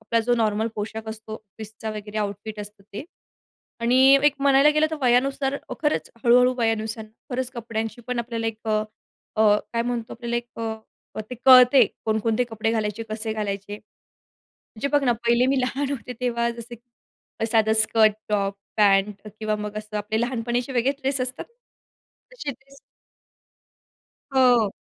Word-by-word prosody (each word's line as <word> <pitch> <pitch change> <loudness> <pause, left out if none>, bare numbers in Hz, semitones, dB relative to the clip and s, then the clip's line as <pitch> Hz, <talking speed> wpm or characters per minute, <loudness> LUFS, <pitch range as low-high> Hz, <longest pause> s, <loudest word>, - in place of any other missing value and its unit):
आपला 230 +1 0
जो 240 +2 +1
नॉर्मल 220 0 +1
पोशाख 220 +1 -5
असतो 220 0 -8
ऑफिसचा 220 +1 -9
वगैरे 210 0 -6
आउटफिट 210 +1 -4
असतं 205 0 -10
ते. 210 - -6 0.8
आणि 240 +2 +2 0.3
एक 295 -1 +5
म्हणायला 275 +1 +5
गेलं 310 +1 +3
तर 315 - -3
वयानुसार 270 +2 +2
हो, - - -5
खरंच 300 -1 0
हळू-हळू 250 +1 +5
वयानुसार 220 -1 -1 0.3
खरंच 250 0 -2
कपड्यांची 225 0 -4
पण 250 -1 -2
आपल्याला 230 -1 -3
एक 225 -1 -3
अ, 215 0 +2 0.5
अ, 210 -1 +5 0.2
काय 230 - 0
म्हणतो 235 -1 -3
आपल्याला 235 -1 -4 0.5
अ, - - -2
ते - - -4
कळते 255 -1 +8 0.2
कोणकोणते 220 +2 +1
कपडे 225 0 -1
घालायचे, 215 0 -2
कसे 220 0 -3
घालायचे. 205 -1 -4 0.8
म्हणजे 230 +5 -6
बघ 280 - -1
ना 245 - +3
पहिले 235 +1 +3
मी 265 - +1
लहान 270 +2 -1
होते 250 -2 -5
तेव्हा 235 -1 0
जसं 235 0 -9
की 235 -1 -10
साधं 220 -1 +3
स्कर्ट, 220 -1 +4 0.2
टॉप, 200 -1 0 0.2
पॅन्ट 200 0 +2
किंवा 215 -1 -1
मग 210 0 -5
असं 215 0 -5
आपले 210 +1 -2
लहानपणीचे 245 +1 -2
वेगळे 250 +3 +2
ड्रेस 270 -1 0
असतात. 255 +1 -2 0.9
तशे 295 -13 -5
ड्रेस 275 +1 -18 1.6
हो, 245 -4 +5
230 Hz, 150 wpm, -24 LUFS, 215-250 Hz, 1.6 s, कळते